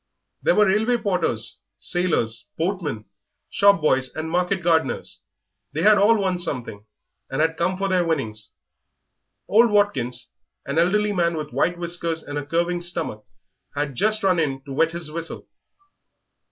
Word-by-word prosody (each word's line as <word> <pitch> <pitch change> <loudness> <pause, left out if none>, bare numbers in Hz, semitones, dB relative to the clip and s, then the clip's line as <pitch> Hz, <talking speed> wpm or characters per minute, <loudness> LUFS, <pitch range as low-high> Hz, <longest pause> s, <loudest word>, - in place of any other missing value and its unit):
There - - +3
were 210 - +5
railway 220 +5 +2
porters, 180 - -2 0.2
sailors, 175 - -1
boatmen, 160 - -2 0.5
shop 200 -3 +4
boys, 130 -4 +2
and 160 +1 -4
market 180 +1 0
gardeners. 165 -1 0 0.5
They - - -1
had 210 -1 +6
all 220 +3 +5
won 185 -2 0
something, 120 - -3 0.4
and 135 - -3
had 160 +1 +2
come 180 +3 0
for 195 +1 -1
their 185 -2 +2
winnings. 125 -11 -3 0.9
Old 230 +3 +5
Watkins, 125 - 0 0.3
an 140 +3 0
elderly 210 +4 +2
man 170 -3 +1
with 150 -1 -5
white 175 0 +1
whiskers 170 -2 -2
and 145 0 -4
a - - -5
curving 170 +2 0
stomach, 165 -11 -3 0.5
had 145 -1 -2
just 215 - +1
run 185 -3 +3
in 135 -4 -1
to 140 -1 -8
wet 165 +4 +2
his 170 -3 -4
whistle. 165 +1 -6
170 Hz, 155 wpm, -23 LUFS, 145-190 Hz, 0.9 s, had